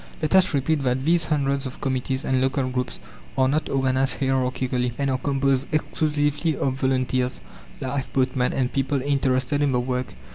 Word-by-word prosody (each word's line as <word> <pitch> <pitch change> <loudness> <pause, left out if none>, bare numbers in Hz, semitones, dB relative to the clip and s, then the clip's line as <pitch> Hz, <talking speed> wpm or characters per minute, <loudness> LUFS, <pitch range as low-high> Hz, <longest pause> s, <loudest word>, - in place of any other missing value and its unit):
Let 155 +1 -1
us 190 -1 +5
repeat 145 +1 +1
that 130 0 0
these 170 0 +3
hundreds 140 -3 0
of 130 - -9
committees 130 +1 -1
and 130 -1 +1
local 130 0 +1
groups 125 0 -3 0.4
are 130 0 +4
not 150 +4 0
organized 135 0 +1
hierarchically, 130 -2 0
and 140 -1 0
are 130 - 0
composed 135 -1 +1
exclusively 150 0 0
of 135 - 0
volunteers, 130 -1 0 0.4
lifeboatmen, 130 -1 0
and 125 -2 -1
people 135 +1 0
interested 135 0 +1
in 140 -2 +2
the 125 - +2
work. 125 - -3
135 Hz, 160 wpm, -24 LUFS, 130-140 Hz, 0.4 s, us